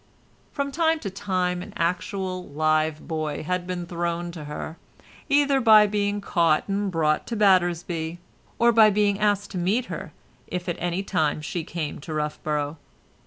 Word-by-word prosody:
From 280 -1 -2
time 325 +2 +2
to 200 - -4
time 185 -2 -1
an - - -9
actual 185 +2 -2
live 155 +1 0
boy 155 -2 -3
had 180 +2 -2
been 180 -1 -3
thrown 170 0 -3
to 160 -3 -8
her, 150 +2 -6 0.5
either 280 -1 +3
by 215 -3 +8
being 205 0 -1
caught 170 -5 +2
and 200 0 -1
brought 155 -3 +1
to 235 - -3
Battersby, 175 -4 +2 0.4
or 235 0 +5
by 220 -2 +7
being 205 -1 +2
asked 205 -1 +1
to 185 - -3
meet 205 +8 +1
her - - -6 0.4
if 180 0 -4
at 175 - -2
any 175 +2 -1
time 160 -7 0
she 160 +2 -4
came 155 -2 -4
to 155 +2 -6
Roughborough. 150 0 -2
180 Hz, 165 wpm, -25 LUFS, 160-205 Hz, 0.5 s, by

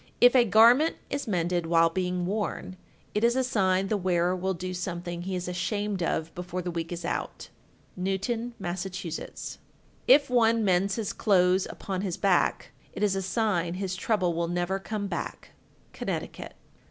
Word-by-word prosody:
If 245 +1 +7
a 245 -2 +6
garment 235 - +6 0.2
is 280 -2 -2
mended 175 -3 0
while 165 0 +4
being 180 0 -1
worn, 200 -1 -3 0.4
it 210 - 0
is 235 +1 +4
a 260 - +2
sign 195 -5 +1
the 210 - +1
wearer 180 -1 +1
will 190 +1 -1
do 185 +2 -5
something 175 -1 -4
he 185 +1 -3
is 180 0 -3
ashamed 195 +2 -2
of 165 -1 -1
before 180 0 -5
the 175 - -3
week 165 0 -4
is 175 0 -5
out. - - -4 0.5
Newton, 225 +6 -2
Mass. 175 -1 -3
1379. 180 -4 -6 0.5
If 300 -12 +7
one 230 -3 +3
mends 195 +1 +2
his 220 -4 -3
clothes 185 -2 +3
upon 190 -2 -4
his 190 -4 -3
back, 195 -3 +1 0.2
It - - -3
is 200 -2 +2
a 195 - -1
sign 185 -4 0
his 185 -1 -3
trouble 185 -3 0
will 170 +1 -1
never 175 +2 -1
come 205 +1 -4
back. 200 - -5 0.4
_Connecticut. - - -5
185 Hz, 170 wpm, -27 LUFS, 175-210 Hz, 0.5 s, If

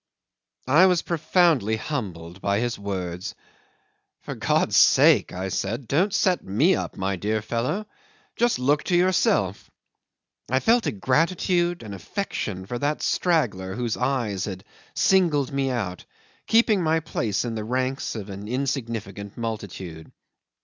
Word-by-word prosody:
'I 155 +9 +6
was 180 -2 +2
profoundly 160 - +2
humbled 95 - -5
by 100 0 +1
his 120 -1 -2
words. 90 -3 -4 0.9
"For - - -6
God's - - +1
sake," - - +5
I 95 +2 -4
said, 110 +7 -3
"don't 180 - +2
set 185 -2 +1
me 135 - +3
up, - - -5
my 95 0 -1
dear 105 +4 -1
fellow; 120 - -2 0.5
just 240 0 +2
look 145 +4 +2
to 180 - +1
yourself." 175 - +1 0.8
I 130 +2 +2
felt 230 - +3
a - - +1
gratitude, 170 - +1
an 105 -2 -7
affection, 100 - -4
for 120 +4 -4
that 145 +3 -1
straggler 105 - 0
whose 120 -1 -2
eyes 110 -8 -1
had 95 -2 -6 0.3
singled 165 -8 +3
me 140 -1 0
out, 100 -8 -3 0.4
keeping 225 -3 +4
my 160 -1 +2
place 115 -9 -2
in 120 - -3
the 110 -1 -4
ranks 130 +4 -2
of 105 -2 -6
an 100 +2 -7
insignificant 115 -6 -4
multitude. 95 -8 -6
120 Hz, 140 wpm, -24 LUFS, 100-160 Hz, 0.9 s, I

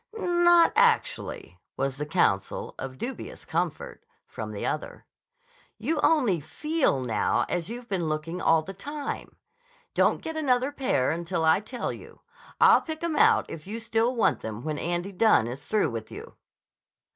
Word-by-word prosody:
"Not 345 -3 +4
actually," 470 0 +1 0.2
was 135 0 -1
the 150 +1 -4
counsel—of 130 - -1
dubious 260 - -6
comfort—from - - -5
the - - -4
other. - - -4 0.7
"You 315 -1 -1
only 250 - +3
feel 300 - 0
now 110 -5 +1
as 175 0 -2
you've 240 +1 -7
been 180 -6 -1
looking 155 +3 -3
all 165 -1 +4
the 195 - -8
time. 290 +9 -6 0.6
Don't - - +2
get 320 - -4
another 265 -3 +1
pair 255 - 0
until 170 0 -2
I 160 +3 +5
tell 235 +4 -4
you. - - -13 0.4
I'll - - +7
pick 315 0 -6
'em 335 -2 -1
out 450 +3 +5
if 160 +1 -9
you 220 +3 -4
still 230 +2 0
want 230 - +2
them 110 +1 -6
when 155 -1 -3
Andy 175 +3 -2
Dunne 200 - +4
is 125 +5 -7
through 210 - +1
with 115 -1 -6
you." - - -9
200 Hz, 155 wpm, -27 LUFS, -, 0.7 s, I'll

